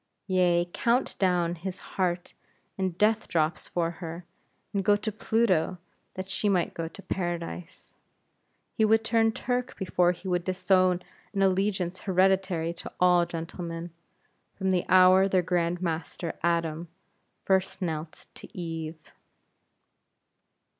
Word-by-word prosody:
Yea, 180 -2 +2
count 240 +3 +1
down 180 -3 +2
his 180 +2 -5 0.2
heart 180 -2 -1 0.4
in 190 -1 0
death 215 +5 +2
drops 155 -1 0
for 170 -1 -1
her; 170 0 -7 0.5
and 200 -1 0
go 205 +2 +5
to 215 +1 -3
Pluto, 210 -5 +1 0.4
that 185 0 -5
she 205 +2 0
might 180 -3 +1
go 165 -1 -4
to 195 +4 -12
Paradise. 175 -1 -5 0.8
He 220 - +1
would 220 +1 +4
turn 225 0 +3
Turk 250 +2 -2
before 180 -2 +2
he 180 +2 -8
would 180 -1 0
disown 185 0 +2 0.3
an 195 - +2
allegiance 190 -1 +1
hereditary 185 -3 +1
to 170 - -8
all 180 -1 +4
gentlemen, 165 0 -6 0.6
from 190 -1 0
the 180 -2 +1
hour 185 +1 +7
their 185 -2 +2
Grand 175 0 0
Master, 165 0 -3
Adam, 170 -1 0 0.6
first 190 -1 +1
knelt 160 -3 -4
to - - -13
Eve. 165 -2 -4
180 Hz, 130 wpm, -28 LUFS, 170-195 Hz, 0.8 s, hour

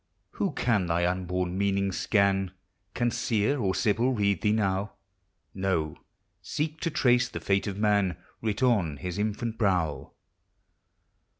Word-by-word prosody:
Who - - -2
can 105 -7 +1
thy 85 +1 +1
unborn 90 0 -1
meaning 100 -1 +1
scan? 95 -1 +1 0.4
Can 120 0 +1
Seer 115 +6 0
or 95 -5 0
Sibyl 120 +3 +2
read 100 -3 +1
thee 105 - +2
now? 100 -2 0 0.6
No, 95 -5 -1 0.5
seek 155 +1 -3
to 165 - 0
trace 125 -4 +3
the - - -5
fate 100 0 0
of 100 -1 -3
man 100 -5 +2 0.2
Writ 110 +2 -1
on 95 - +2
his 90 +7 -5
infant 110 +2 -2
brow. 90 -8 0
100 Hz, 135 wpm, -28 LUFS, 95-110 Hz, 0.6 s, trace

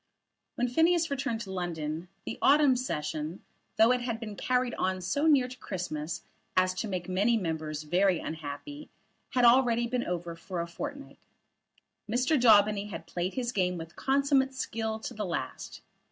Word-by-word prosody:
When 245 - +1
Phineas 325 +5 +3
returned 270 -5 -1
to 195 -4 -7
London, 165 -2 -3 0.2
the - - -5
autumn 285 -2 +5
Session, 155 -7 -3 0.3
though 225 +2 +6
it 250 0 +2
had 235 -2 -3
been 215 -3 -6
carried 250 +2 0
on 185 0 -1
so 285 - 0
near 275 -5 +5
to 255 0 -10
Christmas 170 -4 -4 0.3
as 185 0 +4
to 200 +4 -3
make 185 -3 -3
many 200 +6 +2
members 155 -5 -3
very 180 +4 +3
unhappy, 160 - -7 0.5
had 250 -1 +5
already 240 -1 +5
been 240 +1 -1
over 175 -1 -4
for 180 +2 -6
a 170 - -1
fortnight. 280 +11 -7 0.9
Mr. 250 +7 +2
Daubeny 210 -5 +5
had 165 -5 -7
played 175 +2 -3
his 245 -2 -1
game 180 -4 0
with 165 0 -8
consummate 270 -1 +2
skill 220 -4 -2
to 220 - -6
the 210 - -4
last. 175 -4 -5
215 Hz, 165 wpm, -29 LUFS, 175-255 Hz, 0.9 s, though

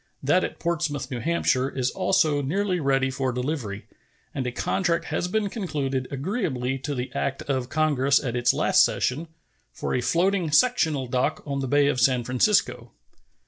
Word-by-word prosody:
That 180 +7 +3
at - - -4
Portsmouth, 155 -5 -2
N. 120 -2 -3
H., 170 +1 +1
is 130 0 -1
also 155 -6 +2
nearly 185 +6 -1
ready 135 -2 +1
for 130 -1 -1
delivery; 125 -5 -4 0.5
and 130 -3 -3
a - - -2
contract 170 +6 -1
has 180 - -2
been 210 +2 0
concluded, 140 - -3
agreeably 135 - -2
to 145 +2 -4
the 125 0 -4
act 135 -1 -2
of 130 -3 -2
Congress 140 -3 +2
at 125 -3 -4
its 120 0 +3
last - - +4
session, 150 +6 -1 0.4
for - - -4
a 125 - +1
floating 175 +5 +1
sectional 160 - +2
dock 125 +4 -1
on 140 -2 -3
the 135 - -2
Bay 145 +2 +3
of 140 -3 +1
San 125 0 +3
Francisco. 130 - +1
140 Hz, 170 wpm, -25 LUFS, 130-170 Hz, 0.5 s, last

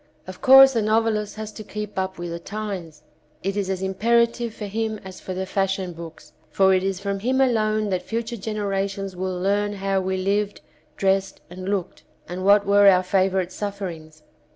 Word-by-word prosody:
Of 185 0 -10
course 270 +1 +8
the 230 - +1
novelist 215 -1 +1
has 215 0 -6
to 215 - -9
keep 210 -1 -5
up 190 0 -3
with 175 0 -5
the 170 - -5
times; 185 -6 -6 0.4
it 195 +1 -1
is 200 -2 -2
as 190 0 -2
imperative 235 +4 +1
for 210 - -7
him 220 +2 -2
as 190 -1 -9
for 185 - -6
the 190 +1 -2
fashion 195 -1 -1
books, 165 -1 -11 0.2
for 190 +4 +4
it 185 - +3
is 195 -1 -1
from 200 0 -3
him 255 +6 0
alone 215 -4 +2
that 185 - 0
future 230 +1 -4
generations 195 -2 -3
will 185 0 -3
learn 205 +2 0
how 195 -1 -1
we 190 0 -2
lived, 200 +2 -1 0.4
dressed 195 0 0
and 185 +1 -6
looked, 190 -3 -3 0.3
and 180 +1 -5
what 200 +1 +5
were 200 0 +5
our 185 -1 +6
favourite 185 -1 +1
sufferings. 175 -7 -6
195 Hz, 185 wpm, -23 LUFS, 185-215 Hz, 0.4 s, course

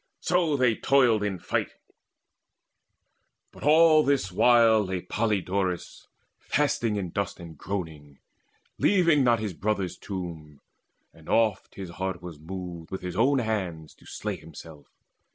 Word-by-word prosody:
So 170 -4 +1
they 125 -3 +3
toiled 125 -6 +3
in 100 -2 -2
fight; - - -2 1.8
But - - -16
all 155 +1 +6
this 135 -10 0
while 115 +1 +5
lay 95 -2 -3
Podaleirius 95 -3 -2 0.3
Fasting 120 -7 0
in 95 -4 -3
dust 100 +1 -3
and 85 -2 -10
groaning, 80 -6 -6 0.6
leaving 170 -8 +4
not 120 -2 +4
His 105 -3 -3
brother's 100 -1 -2
tomb; 85 -6 -7 0.5
and 80 -1 -16
oft 110 -4 +1
his 95 -3 -7
heart 95 0 -4
was 85 -3 -10
moved 85 0 -7
With 95 - -5
his 90 -1 -5
own 130 +7 +3
hands 95 -10 -3
to - - -21
slay - - -4
himself. 80 -1 -13
100 Hz, 135 wpm, -26 LUFS, 85-120 Hz, 1.8 s, all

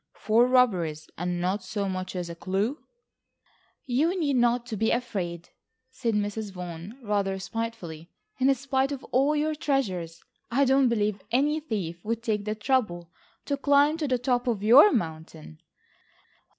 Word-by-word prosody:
Four 230 +3 +3
robberies 185 -12 +2
and 175 +1 -2
not 185 +3 -1
so 200 +1 -3
much 185 0 -4
as 180 -1 -3
a 170 - -6
clue." 200 - -2 1.0
"You 310 +9 +1
need 285 -5 +1
not 240 0 +2
be 225 - +2
afraid," 180 -8 -3 0.4
said 240 -4 -2
Mrs. 205 0 -2
Vaughan 180 +4 -8
rather 200 -2 0
spitefully. 190 -6 -5 0.3
"In 265 +1 +4
spite 265 +1 0
of 275 -2 -5
all 275 +4 +3
your 305 +1 0
treasures, 190 - -2 0.3
I 275 +4 +3
don't 265 -1 +4
believe 210 -3 0
any 290 +6 +2
thief 190 - -4
would 230 +1 -3
take 210 -3 -1
the 215 0 -2
trouble 210 -8 -1 0.3
to 285 - 0
climb 285 +2 +3
to 310 -3 -2
the 255 -2 +1
top 245 0 0
of 220 -4 -1
your 265 - +8
mountain." 160 - -4
225 Hz, 150 wpm, -27 LUFS, 185-265 Hz, 1.0 s, your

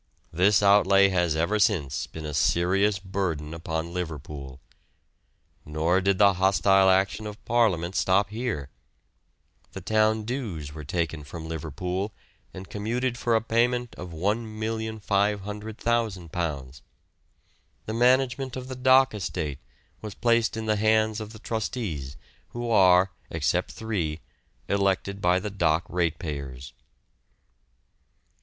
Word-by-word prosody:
This 95 +5 +4
outlay 100 -1 +5
has 85 -4 +1
ever 85 +7 +1
since 80 -9 +1
been 80 -1 -8
a 75 - -5
serious 95 +7 +2
burden 95 -5 -3
upon 80 0 -4
Liverpool. 75 -6 -6 1.0
Nor 80 +5 +1
did 95 0 +2
the 100 -1 +6
hostile 95 +1 +4
action 95 +3 +1
of 105 +1 -10
Parliament 100 -7 +1
stop 100 +2 +2
here. 110 - -3 1.0
The - - -7
town 110 0 +2
dues 105 - -5
were 75 0 -8
taken 80 0 -2
from 80 +2 -8
Liverpool, 90 +6 -4 0.4
and 95 0 -9
commuted 120 +4 -2
for 120 -1 0
a 110 - +3
payment 120 +1 +1
of 90 - -8
£1,500,000. 105 - -2 1.0
The 110 - -4
management 130 +2 +2
of 130 -1 -6
the 130 - -5
dock 130 0 +5
estate 80 -8 -4 0.4
was 105 -2 -7
placed 115 -1 +2
in 110 - -4
the 110 -1 +1
hands 110 0 +2
of 110 0 -7
the 110 - -11
trustees, 105 - -4 0.3
who 120 0 -5
are, 95 -2 +5 0.2
except - - 0
three, 90 -9 -3 0.5
elected 100 0 0
by 90 0 +3
the 105 +2 -5
dock 85 -3 +1
ratepayers. 75 -7 -3
100 Hz, 120 wpm, -26 LUFS, 85-110 Hz, 1.0 s, the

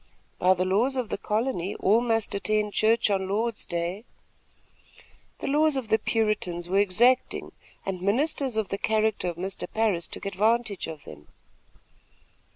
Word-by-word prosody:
"By 185 +1 +4
the 185 +1 0
laws 220 +9 +1
of 250 -4 -2
the - - -2
colony, 210 -3 -1
all 215 +4 +3
must 225 -3 0
attend 210 +1 0
church 220 0 +3
on 190 -1 0
Lord's 225 +3 -1
day." 175 +4 -3 1.4
The - - -3
laws 300 0 +3
of 245 -5 -4
the 220 0 +3
Puritans 205 -6 -1
were 195 +2 +2
exacting, 230 +6 +2 0.3
and 190 -2 -3
ministers 260 - 0
of 215 -3 -1
the 195 - -3
character 220 -3 +1
of 170 - -5
Mr. 190 +2 -4
Parris 210 -7 +1
took - - -8
advantage 210 +2 0
of 160 -3 -8
them. 75 0 -12
210 Hz, 155 wpm, -26 LUFS, 185-230 Hz, 1.4 s, By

